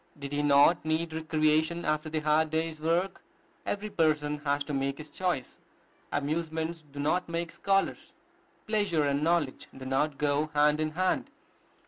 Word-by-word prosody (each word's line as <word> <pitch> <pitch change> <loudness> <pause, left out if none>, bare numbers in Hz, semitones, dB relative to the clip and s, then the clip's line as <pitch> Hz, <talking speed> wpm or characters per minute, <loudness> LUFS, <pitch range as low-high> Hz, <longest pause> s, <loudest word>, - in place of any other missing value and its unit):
Did 140 -1 -7
he 145 - +1
not 145 +3 +5
need 160 +1 -1
recreation 160 +1 +1
after 155 +1 0
the 155 0 -2
hard 155 +1 +3
day's 160 0 -2
work? 170 +4 0 0.5
Every 210 +1 -2
person 150 -3 +1
has 145 -1 0
to 145 - -5
make 135 0 -1
his 155 -1 -10
choice. 180 -9 -2 0.5
Amusements 160 +2 -2
do 145 - -8
not 170 +5 0
make 170 0 -3
scholars: 195 0 0 0.5
pleasure 205 -8 +1
and 140 0 +1
knowledge 165 -5 0
do 130 - -8
not 135 +2 0
go 150 +1 +1
hand 150 +1 +4
in 155 0 0
hand. 185 +3 0
155 Hz, 155 wpm, -29 LUFS, 145-165 Hz, 0.5 s, not